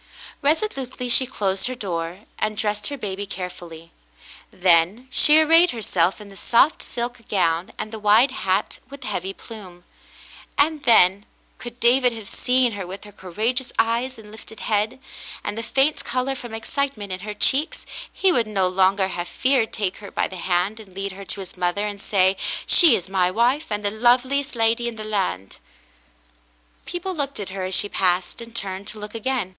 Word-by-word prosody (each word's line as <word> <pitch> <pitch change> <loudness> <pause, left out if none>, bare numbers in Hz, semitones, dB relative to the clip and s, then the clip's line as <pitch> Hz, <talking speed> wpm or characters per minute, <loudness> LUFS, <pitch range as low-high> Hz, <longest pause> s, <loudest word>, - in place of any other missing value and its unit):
Resolutely 280 - -1
she 255 +2 +4
closed 195 -6 -1
her 255 - -4
door, 175 -4 -4 0.2
and 215 0 -1
dressed 210 -1 0
her 285 - -3
baby 200 -3 -5
carefully; 175 -3 -8 0.6
then 180 +7 +3
she 305 +1 +6
arrayed 330 +3 +5
herself 190 - 0
in 210 -1 -11
the 195 - -14
soft 235 +9 +3
silk 240 +1 -5
gown, 170 -3 +1
and 215 0 -5
the 220 - -6
wide 215 +5 +5
hat 190 -7 -1
with 280 0 -11
the - - -7
heavy 190 -1 -3
plume, 195 -5 -12 0.7
and 300 0 +1
then 200 -3 +5
— - - -37
could 240 0 -9
David 245 +1 +3
have 220 -3 -8
seen 250 +2 +1
her 200 -4 -6
with 190 +2 -8
her 210 - -12
courageous 220 +7 -2
eyes 235 +3 0
and 210 -2 -13
lifted 220 0 -12
head, 215 +3 0 0.4
and - - -3
the 225 - -4
faint 270 +6 +1
color 255 +2 -1
from 240 -4 -8
excitement 225 -3 -3
in 185 - -3
her 210 +2 -6
cheeks 280 +9 +2 0.2
— - - -11
he 385 - +2
would 240 -9 +1
no 195 -3 +1
longer 190 +1 +2
have 175 -1 -4
feared 255 +2 +1
to - - -7
take 195 -4 -2
her 200 -2 -10
by - - -1
the 190 - -9
hand 180 +4 0
and 195 -4 -14
lead 195 0 -3
her 195 +1 -10
to 195 - -1
his 185 - -10
mother 180 +3 -1
and 205 -1 -5
say, 190 -2 +2 0.3
"She 330 -9 +7
is 180 - -4
my 185 -2 +2
wife, 240 +9 +1
and 210 -1 -3
the 205 - +1
loveliest 255 +5 +2
lady 230 +1 +1
in 235 - -4
the 215 - -7
land." 95 - -3 1.3
People 355 +2 -4
looked 280 -6 -2
at 200 - -4
her 190 -1 -4
as 185 0 +1
she - - +2
passed, 185 0 0
and 230 0 -11
turned 195 -2 -4
to 215 - -6
look 210 0 -8
again. 230 -3 -2
215 Hz, 195 wpm, -23 LUFS, 190-250 Hz, 1.3 s, She